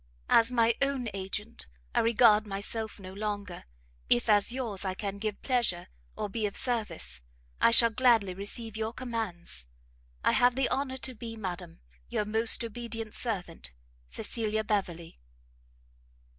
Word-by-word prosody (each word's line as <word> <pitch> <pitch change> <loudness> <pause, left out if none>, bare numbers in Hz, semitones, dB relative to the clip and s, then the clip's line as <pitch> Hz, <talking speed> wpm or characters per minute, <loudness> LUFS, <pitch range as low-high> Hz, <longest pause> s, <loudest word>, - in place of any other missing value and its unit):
As 230 +2 +6
my 235 -1 +4
own 275 -4 +1
Agent 200 +4 -3 0.3
I - - +3
regard 220 -2 +5
myself 210 +2 -3
no 185 -1 -9
longer; 205 - -4 0.4
if, 120 - +4
as 205 +1 +4
yours, 235 -7 -3
I 190 -1 -2
can 200 0 -4
give 215 -1 -3
pleasure, 240 -9 +1 0.3
or - - -2
be 215 +1 -1
of 200 - -7
service, 210 - -2 0.4
I - - +6
shall 230 0 +7
gladly 225 -5 +4
receive 205 +3 -4
your 220 +1 -2
commands. 220 - -4 0.6
I - - +4
have 245 0 +4
the 265 0 +1
honour 265 -1 -1
to 260 0 -5
be, 230 0 -7
Madam, 175 - -6 0.3
your 210 - 0
most 220 +3 +3
obedient 230 -1 -5
servant, 180 - -3 0.3
CECILIA 220 - -1
BEVERLEY. 180 - -2
215 Hz, 145 wpm, -30 LUFS, 195-235 Hz, 0.6 s, shall